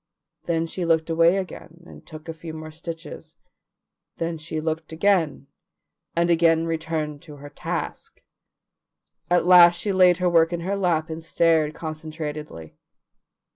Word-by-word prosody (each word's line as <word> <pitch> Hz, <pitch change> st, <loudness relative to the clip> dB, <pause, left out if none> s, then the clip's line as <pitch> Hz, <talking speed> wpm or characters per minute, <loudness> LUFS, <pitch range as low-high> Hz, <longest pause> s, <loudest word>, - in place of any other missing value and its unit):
Then 165 Hz, -1 st, 0 dB
she 175 Hz, +2 st, -5 dB
looked 165 Hz, -1 st, +1 dB
away 165 Hz, +3 st, +4 dB
again 175 Hz, -2 st, -7 dB
and -, -, -14 dB
took 155 Hz, 0 st, -12 dB
a 165 Hz, -, -4 dB
few 160 Hz, 0 st, -9 dB
more 155 Hz, 0 st, -8 dB
stitches, 165 Hz, +1 st, -9 dB, 0.8 s
then 165 Hz, -1 st, -3 dB
she 155 Hz, 0 st, -4 dB
looked 160 Hz, 0 st, -3 dB
again, 160 Hz, -5 st, +1 dB, 0.7 s
and 170 Hz, +1 st, +2 dB
again 165 Hz, -1 st, +3 dB
turned 155 Hz, -2 st, -4 dB
to 150 Hz, -3 st, -12 dB
her 145 Hz, 0 st, -11 dB
task. -, -, -5 dB, 1.1 s
At 175 Hz, -1 st, +3 dB
last 175 Hz, -1 st, +7 dB
she 205 Hz, -, -1 dB
laid 180 Hz, -2 st, +5 dB
her 180 Hz, 0 st, 0 dB
work 165 Hz, -1 st, +4 dB
in 170 Hz, -1 st, -3 dB
her 190 Hz, +4 st, -2 dB
lap 170 Hz, -5 st, 0 dB
and 160 Hz, +1 st, -6 dB
stared 160 Hz, -2 st, +2 dB
concentratedly. 155 Hz, -, -7 dB
165 Hz, 145 wpm, -24 LUFS, 155-170 Hz, 1.1 s, last